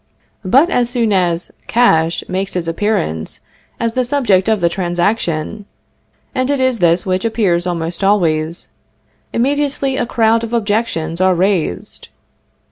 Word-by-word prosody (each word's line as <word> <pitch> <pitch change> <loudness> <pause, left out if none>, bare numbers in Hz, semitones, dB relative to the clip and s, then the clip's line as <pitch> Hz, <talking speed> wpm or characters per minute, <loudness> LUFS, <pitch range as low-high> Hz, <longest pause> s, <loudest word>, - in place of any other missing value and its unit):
But 270 - +4
as 240 -1 +1
soon 235 -4 +1
as 175 -2 0 0.2
cash 165 -9 +2
makes 190 +1 -3
its 175 -2 -2
appearance 165 - -2 0.4
as 230 -1 -1
the 255 - +1
subject 235 -7 +2
of 220 -2 +2
the 170 - +2
transaction 175 +1 -1 0.7
(and 255 0 -1
it 285 -1 +1
is 260 -3 +1
this 170 0 +2
which 185 0 -1
appears 200 -6 +1
almost 170 +1 -3
always), 170 -4 +1 0.6
immediately 275 +1 0
a 240 - -1
crowd 225 -1 +2
of 230 0 -5
objections 205 -7 -1
are 185 -1 +4
raised. 175 - -1
195 Hz, 135 wpm, -16 LUFS, 170-235 Hz, 0.7 s, But